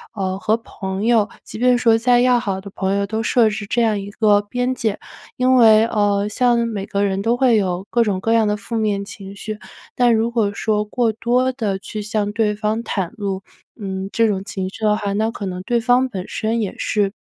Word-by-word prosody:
呃， 190 Hz, -2 st, -2 dB
和 220 Hz, +3 st, +1 dB
朋 195 Hz, -2 st, -5 dB
友， 225 Hz, -3 st, +3 dB
即 215 Hz, -, -9 dB
便 250 Hz, 0 st, +4 dB
说 230 Hz, -2 st, +4 dB
再 240 Hz, +1 st, +3 dB
要 250 Hz, -1 st, +4 dB
好 195 Hz, -5 st, -3 dB
的 200 Hz, 0 st, -10 dB
朋 195 Hz, 0 st, -1 dB
友， 200 Hz, 0 st, 0 dB
都 220 Hz, +2 st, -3 dB
设 225 Hz, 0 st, +3 dB
置 210 Hz, -1 st, -5 dB
这 235 Hz, -1 st, +2 dB
样 215 Hz, -2 st, +1 dB
一 200 Hz, -, -7 dB
个 205 Hz, -1 st, +3 dB
边 245 Hz, +5 st, -2 dB
界。 220 Hz, -5 st, -2 dB, 0.4 s
因 255 Hz, 0 st, +3 dB
为 220 Hz, -1 st, +6 dB
呃， 205 Hz, -2 st, +1 dB
像 235 Hz, +1 st, +2 dB
每 205 Hz, -3 st, -4 dB
个 200 Hz, 0 st, -1 dB
人 195 Hz, -1 st, 0 dB
都 235 Hz, +3 st, +1 dB
会 250 Hz, -3 st, +4 dB
有 190 Hz, -2 st, -1 dB
各 235 Hz, 0 st, +3 dB
种 195 Hz, -4 st, -1 dB
各 225 Hz, +3 st, 0 dB
样 225 Hz, -2 st, +3 dB
的 210 Hz, 0 st, 0 dB
负 230 Hz, -, -6 dB
面 205 Hz, -2 st, 0 dB
情 200 Hz, -1 st, -10 dB
绪。 215 Hz, +1 st, -6 dB, 0.4 s
但 245 Hz, -2 st, +4 dB
如 225 Hz, +2 st, 0 dB
果 220 Hz, -4 st, +1 dB
说 210 Hz, +1 st, 0 dB
过 225 Hz, +1 st, 0 dB
多 245 Hz, +4 st, +1 dB
地 220 Hz, -7 st, -2 dB
去 210 Hz, +2 st, -7 dB
向 205 Hz, 0 st, -2 dB
对 210 Hz, -1 st, +1 dB
方 215 Hz, +2 st, -2 dB
袒 190 Hz, -6 st, -3 dB
露， 195 Hz, -2 st, -4 dB, 0.4 s
嗯， 190 Hz, -1 st, -4 dB
这 230 Hz, -1 st, +2 dB
种 195 Hz, -2 st, -1 dB
情 190 Hz, -3 st, -4 dB
绪 220 Hz, -, -10 dB
的 210 Hz, 0 st, +3 dB
话， 200 Hz, -1 st, -2 dB
那 220 Hz, +2 st, 0 dB
可 205 Hz, -3 st, -6 dB
能 180 Hz, -1 st, -4 dB
对 235 Hz, +5 st, 0 dB
方 250 Hz, +2 st, +2 dB
本 190 Hz, -4 st, -5 dB
身 225 Hz, +1 st, -2 dB
也 200 Hz, -, -3 dB
是 205 Hz, -2 st, 0 dB
215 Hz, 245 characters per minute, -20 LUFS, 200-230 Hz, 0.4 s, 为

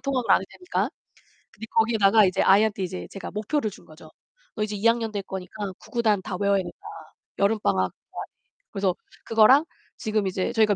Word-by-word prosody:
통학을 265 Hz, -3 st, -1 dB
안 -, -, +5 dB
해도 -, -, -9 dB
되니까. 360 Hz, -1 st, -1 dB, 0.6 s
근데 220 Hz, -, -9 dB
거기에다가 220 Hz, -2 st, +4 dB
이제 185 Hz, -, +1 dB
아이한테 200 Hz, 0 st, +4 dB
이제 180 Hz, 0 st, -5 dB
제가 195 Hz, -, -7 dB
목표를 215 Hz, +3 st, -1 dB
준거죠. -, -, -15 dB, 0.5 s
"너 215 Hz, -, -1 dB
이제 210 Hz, -1 st, -4 dB
2 205 Hz, -, -2 dB
학년 230 Hz, -1 st, +3 dB
될 205 Hz, -, -3 dB
거니까 190 Hz, +2 st, -6 dB, 0.2 s
구구단 220 Hz, -5 st, 0 dB
다 185 Hz, -, -4 dB
외워야 200 Hz, 0 st, +3 dB
된다. 175 Hz, -1 st, -9 dB, 0.6 s
여름방학 150 Hz, -, +1 dB, 0.2 s
동안에." -, -, -6 dB, 0.5 s
그래서 195 Hz, -2 st, 0 dB, 0.3 s
그거랑 240 Hz, +7 st, +5 dB, 0.3 s
지금 215 Hz, -3 st, -1 dB
이제 185 Hz, +4 st, -1 dB
저희가 215 Hz, -3 st, +3 dB
210 Hz, 390 characters per minute, -25 LUFS, 195-225 Hz, 0.6 s, 안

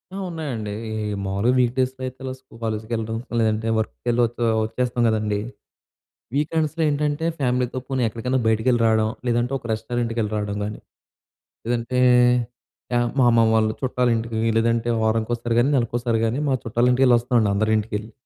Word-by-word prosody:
ఆ! -, -, -4 dB
ఉన్నాయండీ. 130 Hz, -11 st, -4 dB, 0.2 s
ఈ, -, -, -5 dB, 0.2 s
ఈ -, -, -2 dB
మామూలుగా 100 Hz, +5 st, +1 dB
వీక్ 120 Hz, -1 st, +2 dB
డేస్‌లో 130 Hz, 0 st, -1 dB
అయితే 130 Hz, 0 st, -7 dB
ఇలా 130 Hz, -, -3 dB
స్కూ 130 Hz, -, -24 dB
కాలేజ్‌కెళ్లడం, 110 Hz, 0 st, -3 dB, 0.2 s
లేదంటే 110 Hz, 0 st, +1 dB
వర్క్‌కెళ్ళి 120 Hz, +2 st, -1 dB
వచ్చే 120 Hz, +1 st, -4 dB, 0.2 s
వచ్చేస్తాం 120 Hz, +2 st, -2 dB
గ‌దండీ! 105 Hz, -2 st, 0 dB, 1.0 s
వీకెండ్స్‌లో 155 Hz, +2 st, 0 dB
ఏంటంటే, 150 Hz, +2 st, -1 dB
ఫ్యామిలీతో 125 Hz, -1 st, 0 dB
పోనీ 135 Hz, -2 st, -1 dB
ఎక్కడికైనా 125 Hz, +4 st, -1 dB
బయటికెళ్లి 110 Hz, +2 st, +2 dB
రావడం. 110 Hz, -1 st, +3 dB, 0.2 s
లేదంటే 120 Hz, +2 st, +1 dB
ఒక 130 Hz, -, -16 dB
రెస్టారెంట్‌కెళ్లి 115 Hz, -1 st, -2 dB
రావడం 105 Hz, -1 st, -2 dB
గా‌నీ, 105 Hz, +1 st, -5 dB, 0.9 s
లేదంటే, 120 Hz, +2 st, -1 dB, 1.0 s
ఆహ్, 120 Hz, 0 st, +1 dB
మా 130 Hz, -, +5 dB
అమ్మా 115 Hz, -1 st, +4 dB
వాళ్ళు 110 Hz, -1 st, +2 dB
చుట్టాలింటికి 115 Hz, -3 st, 0 dB, 0.2 s
లేదంటే, 115 Hz, +1 st, +1 dB
వారానికోసారి 115 Hz, +1 st, 0 dB
గానీ, 125 Hz, +4 st, +3 dB
నెలకోసారి 120 Hz, -1 st, 0 dB
గానీ 120 Hz, +6 st, -1 dB
మా 135 Hz, -, +3 dB
చుట్టాల 120 Hz, +2 st, +1 dB
ఇంటికె‌ళ్లి 125 Hz, -1 st, +5 dB
వస్తామండి. 120 Hz, -3 st, +1 dB
అందరి 110 Hz, +2 st, +1 dB
ఇంటికి 105 Hz, 0 st, -5 dB
ఎ‌ళ్లి, 110 Hz, +1 st, -13 dB
115 Hz, 150 wpm, -23 LUFS, 110-125 Hz, 1.0 s, మా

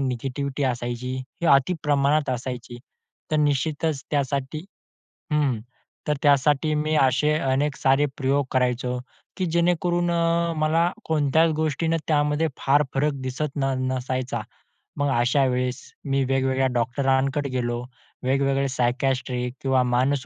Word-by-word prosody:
Negativity 135 Hz, +2 st, -3 dB
असायची 120 Hz, 0 st, -2 dB, 0.2 s
ती 170 Hz, -, 0 dB
अतिप्रमाणात 145 Hz, 0 st, +2 dB
असायची, 125 Hz, -1 st, -5 dB, 0.5 s
तर 155 Hz, -, +2 dB
निश्चितच 150 Hz, 0 st, 0 dB
त्यासाठी 140 Hz, +2 st, -1 dB, 0.7 s
हं, 140 Hz, -7 st, +1 dB, 0.5 s
तर 150 Hz, -, +3 dB
त्यासाठी 145 Hz, +2 st, +3 dB
मी 155 Hz, +1 st, 0 dB
असे 135 Hz, +3 st, +3 dB
अनेक 135 Hz, +1 st, 0 dB
सारे 135 Hz, +2 st, +3 dB
प्रयोग 140 Hz, 0 st, +1 dB
करायचो 125 Hz, -1 st, 0 dB, 0.4 s
की 185 Hz, -, -1 dB
जेणेकरून 175 Hz, +1 st, +1 dB
अ, 170 Hz, 0 st, +1 dB
मला 160 Hz, +3 st, +2 dB
कोणत्याच 160 Hz, +1 st, +2 dB
गोष्टीने 160 Hz, +1 st, 0 dB
त्यामध्ये 150 Hz, +1 st, +2 dB
फार 145 Hz, +2 st, +3 dB
फरक 145 Hz, +2 st, +2 dB
दिसत 135 Hz, +3 st, -3 dB
न 135 Hz, -1 st, 0 dB, 0.2 s
नसायचा. 130 Hz, 0 st, -2 dB, 0.6 s
मग 145 Hz, 0 st, +1 dB
अशा 125 Hz, +4 st, +3 dB
वेळेस 125 Hz, +1 st, -1 dB, 0.2 s
मी 135 Hz, -1 st, +1 dB
वेगवेगळ्या 135 Hz, 0 st, +1 dB
डॉक्टरांकडे 135 Hz, +3 st, 0 dB
गेलो. 120 Hz, -2 st, -2 dB, 0.4 s
वेगवेगळे 135 Hz, +1 st, +1 dB
सायकायट्रिस्ट 130 Hz, +1 st, 0 dB, 0.3 s
किंवा 130 Hz, -1 st, +2 dB
मानस 130 Hz, +2 st, +1 dB
140 Hz, 120 wpm, -24 LUFS, 130-150 Hz, 0.7 s, तर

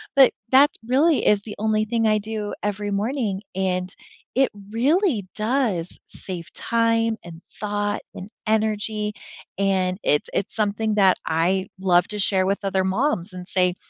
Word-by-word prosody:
but, 270 Hz, -2 st, +7 dB, 0.2 s
that 275 Hz, +3 st, +7 dB, 0.2 s
really 290 Hz, +5 st, +3 dB
is 210 Hz, -1 st, +4 dB
the 210 Hz, -, -8 dB
only 215 Hz, 0 st, +1 dB
thing 225 Hz, 0 st, +1 dB
I 215 Hz, 0 st, +4 dB
do 210 Hz, 0 st, -4 dB
every 205 Hz, 0 st, -2 dB
morning, 210 Hz, -1 st, -1 dB
and 185 Hz, -1 st, -1 dB, 0.4 s
it 265 Hz, +1 st, +4 dB, 0.2 s
really 275 Hz, -, +2 dB
does 215 Hz, -6 st, -1 dB
save 175 Hz, -3 st, -6 dB
time, 230 Hz, -1 st, +1 dB
and 170 Hz, -1 st, -11 dB
thought, 205 Hz, 0 st, -2 dB
and 190 Hz, -, -7 dB, 0.2 s
energy, 215 Hz, -1 st, 0 dB, 0.5 s
and 190 Hz, -1 st, +1 dB
it's 150 Hz, -, +2 dB
it's 195 Hz, -, -2 dB
something 215 Hz, 0 st, 0 dB
that 195 Hz, -3 st, +5 dB
I 180 Hz, +4 st, +1 dB
love 180 Hz, -1 st, +3 dB
to 210 Hz, -, -5 dB
share 190 Hz, -1 st, +2 dB
with 200 Hz, +1 st, -1 dB
other 190 Hz, -1 st, +1 dB
moms 190 Hz, -, 0 dB
and 180 Hz, -1 st, -8 dB
say, 180 Hz, -2 st, +1 dB
205 Hz, 150 wpm, -23 LUFS, 190-225 Hz, 0.5 s, but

